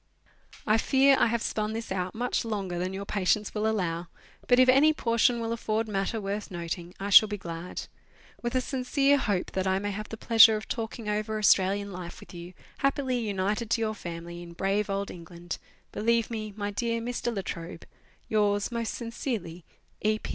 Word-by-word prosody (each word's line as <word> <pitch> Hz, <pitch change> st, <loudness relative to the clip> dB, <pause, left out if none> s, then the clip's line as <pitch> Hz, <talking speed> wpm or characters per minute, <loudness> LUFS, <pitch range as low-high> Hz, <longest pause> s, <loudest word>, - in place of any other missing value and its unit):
I 215 Hz, +1 st, +3 dB
fear 270 Hz, +3 st, +5 dB
I -, -, +5 dB
have 230 Hz, 0 st, -1 dB
spun 215 Hz, 0 st, -1 dB
this 225 Hz, -1 st, -5 dB
out 185 Hz, 0 st, -2 dB
much 245 Hz, +3 st, -1 dB
longer 195 Hz, -6 st, -3 dB
than 185 Hz, +1 st, -2 dB
your 195 Hz, +1 st, -5 dB
patience 205 Hz, +1 st, 0 dB
will 215 Hz, 0 st, 0 dB
allow, 175 Hz, -5 st, -1 dB, 0.4 s
but 245 Hz, -, +5 dB
if 255 Hz, 0 st, +6 dB
any 275 Hz, +5 st, +6 dB
portion 235 Hz, -3 st, +2 dB
will 230 Hz, 0 st, -2 dB
afford 220 Hz, -1 st, -1 dB
matter 205 Hz, +2 st, -1 dB
worth 205 Hz, +1 st, -4 dB
noting 175 Hz, 0 st, -5 dB
I 200 Hz, +1 st, -3 dB
shall 215 Hz, -, +9 dB
be 205 Hz, -, -3 dB
glad. 170 Hz, -1 st, -6 dB, 0.6 s
With 240 Hz, +1 st, -3 dB
a 255 Hz, -, +3 dB
sincere 275 Hz, +2 st, +2 dB
hope 200 Hz, -7 st, -1 dB
that 190 Hz, 0 st, -1 dB
I 190 Hz, 0 st, +2 dB
may 205 Hz, +1 st, -2 dB
have 215 Hz, +2 st, -6 dB
the 225 Hz, -, -6 dB
pleasure 225 Hz, -1 st, +7 dB
of 215 Hz, -, -8 dB
talking 225 Hz, -2 st, -4 dB
over 215 Hz, +1 st, -1 dB
Australian 200 Hz, -1 st, +3 dB
life 180 Hz, -2 st, -7 dB
with -, -, -14 dB
you, 175 Hz, +1 st, -9 dB, 0.2 s
happily 270 Hz, -2 st, +1 dB
united 210 Hz, +1 st, -1 dB
to 230 Hz, 0 st, +1 dB
your 220 Hz, -1 st, 0 dB
family, 170 Hz, -3 st, -7 dB
in 170 Hz, -1 st, -10 dB
brave 195 Hz, +4 st, 0 dB
old 200 Hz, 0 st, -2 dB
England, 170 Hz, 0 st, -8 dB, 0.3 s
Believe 230 Hz, +1 st, +1 dB
me, 215 Hz, -2 st, -4 dB
My 205 Hz, -1 st, -2 dB
dear 230 Hz, +2 st, -1 dB
Mr. 240 Hz, +1 st, -2 dB
La 195 Hz, -, -2 dB
Trobe, 165 Hz, -1 st, -7 dB, 0.4 s
Yours 205 Hz, 0 st, +1 dB
most 235 Hz, -1 st, -2 dB
sincerely, 230 Hz, -, -4 dB, 0.4 s
E. 215 Hz, 0 st, +2 dB
210 Hz, 190 wpm, -28 LUFS, 190-230 Hz, 0.6 s, shall